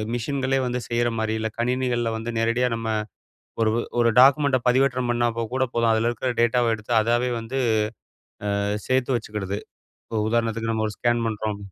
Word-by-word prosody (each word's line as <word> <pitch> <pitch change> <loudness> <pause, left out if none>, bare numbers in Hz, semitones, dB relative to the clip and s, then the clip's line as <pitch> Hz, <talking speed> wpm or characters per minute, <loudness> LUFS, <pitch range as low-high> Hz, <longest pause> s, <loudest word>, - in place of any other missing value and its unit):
மிஷின்களே 135 +2 -1
வந்து 125 0 -2
செய்றமாரி. 115 -2 0
இல்ல, 110 - -1
கணினிகள்ல 125 -1 0
வந்து 115 +1 -4
நேரடியா 115 +2 +1
நம்ம 115 0 -4 0.7
ஒரு 110 -1 +3 0.3
ஒரு 115 - +4
டாக்குமெண்ட்ட 140 -1 +5
பதிவேற்றம் 130 -1 +2
பண்ணாக்கூட 120 +2 0
போதும். 115 -1 +2
அதில 110 +1 +2
இருக்கிற 125 +2 -2
டேட்டாவ 120 -1 +3
எடுத்து 110 +2 -5
அதாவே 120 +2 +1
வந்து 120 +4 -4 1.0
அ - - -1 0.2
சேர்த்து 130 0 +2
வச்சிக்கிடுது. 105 -3 -4 0.5
இப்போ 110 -2 -2
உதாரணத்துக்கு 115 -1 0
நம்ம 110 -1 0
ஒரு 105 - -7
ஸ்கேன் 120 -1 +1
பண்ணுறோம் 105 -1 -3
120 Hz, 150 wpm, -24 LUFS, 115-125 Hz, 1.0 s, டாக்குமெண்ட்ட